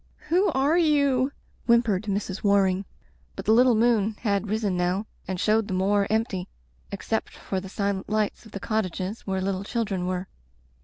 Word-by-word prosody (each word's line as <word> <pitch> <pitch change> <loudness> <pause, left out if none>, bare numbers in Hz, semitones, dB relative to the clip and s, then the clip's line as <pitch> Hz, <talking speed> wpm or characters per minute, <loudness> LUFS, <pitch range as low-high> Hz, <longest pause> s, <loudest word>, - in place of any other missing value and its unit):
"Who 370 +4 +3
are 285 +6 +3
you?" 280 -5 +3 0.4
whimpered 230 -4 +3
Mrs. 200 -1 -3
War 200 -1 +4
ing. 190 +1 -1 0.5
But - - -7
the - - +3
little 245 +1 +5
moon 220 -2 +2
had 200 -2 0
risen 210 -3 0
now 180 +4 0 0.2
and 185 -1 -3
showed 215 +1 +2
the 190 - -2
moor 200 +2 +2
empty 215 -5 -1 0.4
except - - -2
for 190 - -3
the 190 - -9
silent 200 -1 -2
lights 215 +1 -1
of 220 - -15
the 200 - -6
cottages 200 -1 -3
where 190 -1 -1
little 190 0 -2
children 200 -5 -2
were. 185 0 -2
205 Hz, 170 wpm, -25 LUFS, 190-230 Hz, 0.5 s, little